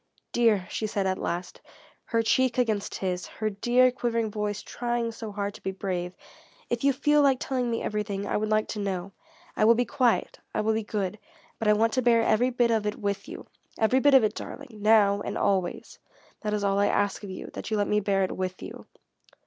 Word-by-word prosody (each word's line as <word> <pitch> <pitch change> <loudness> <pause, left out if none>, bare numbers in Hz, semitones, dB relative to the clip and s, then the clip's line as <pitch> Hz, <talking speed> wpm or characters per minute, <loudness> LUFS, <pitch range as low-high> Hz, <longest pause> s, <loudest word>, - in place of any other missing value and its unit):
"Dear," 225 -6 +3
she 215 - -2
said 205 -2 -1
at 185 0 0
last, 175 +1 -4 0.4
her 230 -1 0
cheek 255 +2 +2
against 220 -5 0
his, 180 -1 -3
her 215 -1 -3
dear, 245 +5 +3
quivering 230 -3 -1
voice 210 -1 -3
trying 240 -1 -2
so 225 -1 -7
hard 200 0 -3
to - - -13
be - - -3
brave, 185 -2 -4 0.6
"if 240 +1 -1
you 280 - +5
feel 295 +3 +3
like 270 -3 +3
telling 250 -2 -1
me 230 - -2
everything, 210 -2 -2
I - - -2
would 215 0 0
like 215 0 +2
to 215 - -4
know. 195 -2 -3 0.4
I - - +1
will 230 +2 +6
be 245 +2 +1
quiet. 245 -3 +1 0.2
I - - +1
will 220 +1 +1
be 220 - 0
good. 205 -1 -3 0.4
But 225 - -1
I 210 - +6
want 225 +2 +2
to 255 - +2
bear 230 -2 +4
every 225 +3 +3
bit 240 -1 +2
of 220 -2 +1
it 210 - -1
with 200 +5 -3
you. 355 - -8 0.3
Every 225 +4 +3
bit 285 +1 +5
of 260 - +7
it, 215 -1 +1
darling 255 -4 -9
now, 205 -2 +4
and 200 - -4
always. 190 -3 -1 0.4
That 210 -1 -2
is 205 - -2
all 200 0 +2
I 205 - +3
ask 205 -1 0
that 195 +1 -7
you 215 - 0
let 205 -1 +1
me 210 - +2
bear 195 -1 +1
it 185 - -2
with 185 -1 -4
you." - - -9
215 Hz, 220 wpm, -27 LUFS, 200-235 Hz, 0.6 s, of